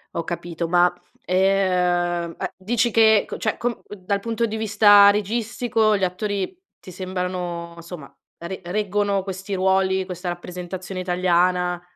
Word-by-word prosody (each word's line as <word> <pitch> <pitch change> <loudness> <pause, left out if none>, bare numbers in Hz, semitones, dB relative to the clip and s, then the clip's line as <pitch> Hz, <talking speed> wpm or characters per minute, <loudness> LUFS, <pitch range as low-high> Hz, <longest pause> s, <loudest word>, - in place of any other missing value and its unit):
Ho 170 - -1
capito, 170 0 -4
ma, 175 0 +4 0.3
ehm, 180 -2 +1
uhm, 190 - -1
dici 230 +4 0
che 220 -1 +6
ecco - - -3
cioè, 215 - -2
co 240 -1 -3
dal 200 0 -3
punto 230 +1 -1
di 220 -1 -4
vista 205 -1 +6
registico 220 +1 0
gli 195 - -3
attori 200 - -3 0.2
ti 185 - -12
sembrano, 180 -2 -4
insomma, 170 -4 -10 0.3
re 180 +3 -7
reggono 200 +1 -1
questi 195 +1 -6
ruoli, 190 0 +1
questa 180 -1 -5
rappresentazione 180 +1 -6
italiana? 180 0 +1
190 Hz, 135 wpm, -22 LUFS, 180-205 Hz, 0.3 s, che